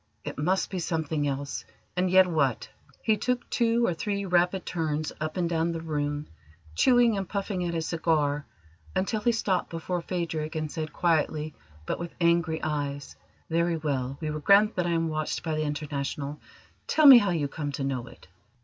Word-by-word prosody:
It - - -5
must 185 +8 +1
be 190 - -2
something 160 -3 -1
else: 140 0 -3 0.3
and 180 +1 +1
yet 185 +1 +7
what? 145 -8 0 0.4
He 220 -1 +3
took 250 +3 -1
two 235 0 +2
or 180 - +1
three 200 +4 -2
rapid 180 +1 +2
turns 155 -2 -2
up 155 +2 -3
and 175 -2 +1
down 165 0 0
the 165 - -3
room, 145 -2 -2 0.5
chewing 240 - +4
and 195 -2 -3
puffing 200 -2 -2
at 170 -1 -2
his 165 -1 -1
cigar, 150 -4 +1 0.5
until 210 +3 0
he 235 - +3
stopped 195 -6 0
before 170 +2 -3
Phadrig, 165 -3 -3
and 155 -1 -2
said 155 -1 -4
quietly, 155 -2 0 0.3
but - - -2
with 170 0 -6
angry 170 -2 +2
eyes: 145 -2 -3 0.3
"Very 170 0 +1
well, 135 -4 -2
we 155 -1 -2
will 155 - -3
grant 200 +7 +5
that 180 -1 0
I 170 - +1
am 165 0 +1
watched 155 -1 -2
by 160 - -2
the 155 - 0
International. 145 -1 -3 0.5
Tell 310 - +3
me 265 -4 +12
how 205 -3 0
you 160 -5 0
came 145 0 -4
to 140 - -3
know 130 -3 -2
it." - - -15
165 Hz, 185 wpm, -27 LUFS, 150-185 Hz, 0.5 s, me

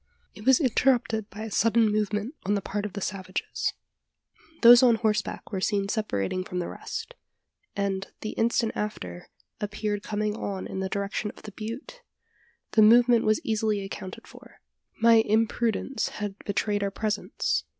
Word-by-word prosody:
It 210 +3 -11
was 265 -1 +7
interrupted 240 -5 +2
by 205 +3 -9
a 220 - -6
sudden 225 0 +3
movement 210 +3 -1
on 205 +2 +1
the 200 - -1
part 205 +2 -3
of 200 - -13
the 200 - -5
savages. 185 -1 -3 0.9
Those 240 +1 +10
on 245 -3 +6
horseback 215 -1 -1
were 190 -3 -2
seen 200 0 0
separating 185 - -1
from 180 - -6
the 175 - -1
rest; - - -6 0.6
and, 195 -1 -1
the 215 - -3
instant 230 0 +1
after, 90 - -5 0.3
appeared 210 0 -2
coming 210 0 -2
on 195 -3 -4
in 190 - -5
the 190 0 -2
direction 200 +2 -2
of - - -13
the 215 - -8
butte! 230 - -7 0.7
The 220 - +4
movement 235 +2 +6
was 215 0 +2
easily 215 -2 0
accounted 185 -1 -8
for. - - -16 0.4
My 230 0 +6
imprudence 225 +3 0
had 205 -1 -4
betrayed 205 0 0
our 200 - 0
presence. 210 +1 -1
210 Hz, 160 wpm, -27 LUFS, 200-225 Hz, 0.9 s, Those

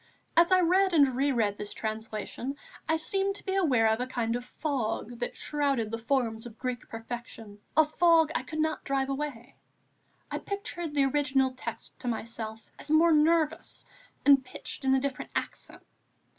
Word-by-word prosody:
As 340 +2 +5
I 370 0 +6
read 370 +2 +3
and 280 -5 +5
re 280 +2 +2
read 210 -5 0
this 210 0 -4
translation, 220 +4 -4 0.3
I 320 - +4
seemed 390 +4 0
to - - -14
be 380 - -1
aware 275 -13 +3
of 220 +1 +2
a 250 - -2
kind 235 -2 -1
of 245 - -3
fog 245 -5 -3
that 245 - -3
shrouded 275 -7 0
the 230 - -3
forms 230 -2 0
of 225 -1 -13
Greek 250 -2 -4
perfection, 225 -2 -8 0.2
a 315 - +7
fog 325 0 +4
I - - 0
could 260 +4 -7
not 315 0 0
drive 270 -1 0
away. 275 -3 -4 0.7
I - - -2
pictured 345 -6 -5
the 280 -1 +4
original 270 -1 +2
text 255 - -8
to 250 - -7
myself 225 -1 -4 0.2
as - - -6
more 320 +2 +5
nervous 315 0 +2 0.4
and 275 -2 +7
pitched 255 - -7
in 265 0 +4
a - - +3
different 270 -1 -3
accent. - - -5
270 Hz, 175 wpm, -29 LUFS, 230-310 Hz, 0.7 s, a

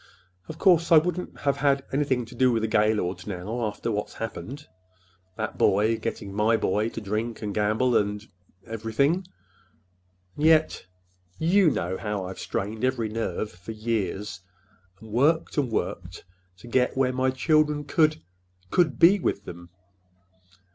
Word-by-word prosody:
Of 155 - -8
course, 170 -2 +4
I 165 - +9
wouldn't 180 +3 -1
have 140 0 0 0.3
anything 135 -4 +1
to 115 - -13
do 130 -1 +3
with 115 -2 0
the - - +1
Gaylords 105 -4 0
now, 105 +5 -3
after 105 +2 -4
what's 105 -1 -3
happened,—that 95 -5 -9
boy 105 +4 +3
getting 105 -3 -5
my 110 +3 +2
boy 105 +1 0
to 115 - -6
drink 110 +2 -3
and 105 -1 -3
gamble, 110 +4 +1
and—and 105 0 0 0.4
everything. 120 - 0 1.1
And 150 - -5
yet—you 95 - +1
know 95 - -2
how 105 -3 -3
I've 95 0 -7
strained 110 +1 -4
every 130 -4 0
nerve 110 -1 -3
for 90 +5 -9
years, 105 -3 -3 0.6
and 110 -1 -13
worked 150 +7 +2
and 135 -4 0
worked 90 -3 -4 0.3
to 120 - -14
get 125 +2 +1
where 130 -1 +2
my 130 +1 +1
children 150 +2 +2
could—could 90 - -1
be 185 - +6
with 100 - -2
them!" 85 0 -10
110 Hz, 140 wpm, -26 LUFS, 95-135 Hz, 1.1 s, I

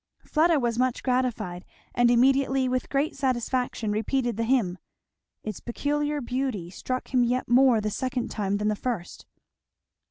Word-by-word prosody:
Fleda 320 0 +3
was 240 -2 -1
much 255 -1 0
gratified, 250 -9 -1 0.3
and 240 0 +4
immediately 265 +2 +3
with 255 0 -1
great 280 +3 0
satisfaction 250 -4 -1
repeated 240 +3 0
the 230 +2 -1
hymn. 220 -8 +1 0.6
Its 215 -3 -5
peculiar 295 +4 -2
beauty 245 -8 -3
struck 255 +7 -5
him 250 -1 +4
yet 250 +2 0
more 245 -1 +5
the 210 0 -2
second 255 +3 -2
time 200 -2 -1
than 210 +1 -1
the 215 - 0
first. 215 -6 -5
250 Hz, 150 wpm, -26 LUFS, 220-265 Hz, 0.6 s, more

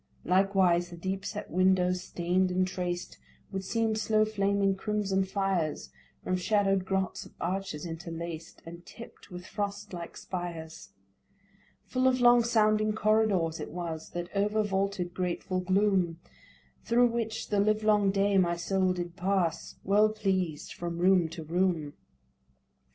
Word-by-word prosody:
Likewise 185 -2 +3
the 175 - -10
deep 190 +2 -3
set 210 +1 -6
windows, 180 0 +2
stain'd 180 +1 0
and 185 +1 +1
traced, 180 -1 -4 0.3
Would 190 0 -3
seem 225 +2 0
slow 215 0 +2
flaming 200 -2 +1
crimson 195 -1 0
fires 190 -5 -1 0.3
From 185 - 0
shadow'd 195 0 +1
grots 190 0 -1
of - - -16
arches 180 -3 -3
interlaced, 165 -1 -7
And 170 +1 -10
tipt 230 +1 -13
with 180 -1 -8
frost 200 -1 -4
like 170 -1 -7
spires. 170 - -6 1.0
Full 255 0 +1
of 255 0 +3
long 240 -1 +6
sounding 215 -2 +2
corridors 210 -6 +2
it - - -5
was, 165 -2 -5 0.2
over 210 +2 +1
vaulted 195 -3 -1
grateful 185 +1 -2
gloom, 185 -3 +1 0.6
Thro' 240 +1 +4
which 230 -2 -2
the 205 - +1
livelong 210 -1 +3
day 195 0 +2
my 170 -2 +2
soul 185 +1 +1
did 175 -1 -5
pass, 185 -3 -1
Well 210 +2 +4
pleased, 190 -7 -2
from 170 -1 -5
room 180 -1 +4
to 165 0 -7
room. 165 -2 0
190 Hz, 135 wpm, -29 LUFS, 175-205 Hz, 1.0 s, long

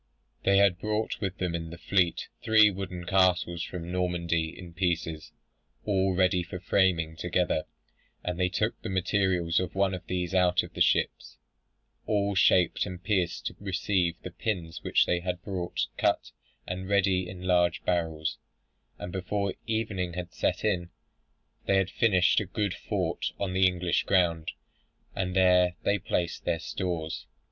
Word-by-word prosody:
They 100 0 +4
had 100 -3 +4
brought 105 +1 -2
with 95 -2 -2
them 90 -2 -2
in 85 -1 -4
the 85 - -9
fleet, 85 +1 +1
three 110 -2 +6
wooden 90 -2 -6
castles 90 -2 +2
from 90 -1 -5
Normandy, 85 -3 0
in 85 -2 -10
pieces, 85 -3 -2 0.5
all 95 -2 +1
ready 90 -1 +3
for 90 +1 -6
framing 90 -3 +2
together, 90 -2 0 0.6
and 90 0 -3
they 90 0 +2
took 90 - -1
the - - -5
materials 95 -3 +1
of 90 -1 -4
one 95 0 +2
of 90 - -5
these 90 0 -2
out 90 -1 +3
of - - -10
the - - -5
ships, - - +1 0.7
all 100 -1 +1
shaped 90 0 +3
and 90 -1 -8
pierced 95 -5 0
to - - -3
receive 95 -3 0
the 90 - -6
pins 85 -3 -3
which - - +3
they 90 - +1
had 90 +1 -4
brought 90 -3 -2
cut - - +1 0.3
and 95 +1 -5
ready 95 -2 +2
in 90 0 -9
large 90 -1 +2
barrels; 80 -3 -1 0.6
and 90 - -6
before 100 +1 -2
evening 105 -6 -1
had 90 0 -6
set - - -1
in, 90 -5 0 0.8
they 100 - +3
had 95 -1 +1
finished 95 -4 +3
a 105 - -3
good 100 0 -1
fort - - -2
on 95 -2 -2
the 95 0 +5
English 90 -1 0
ground, 85 -4 +2 0.7
and 90 -1 -2
there 90 -1 +4
they 100 0 +2
placed 85 -1 -2
their 85 -1 0
stores. 80 -3 -4
90 Hz, 160 wpm, -28 LUFS, 85-95 Hz, 0.8 s, three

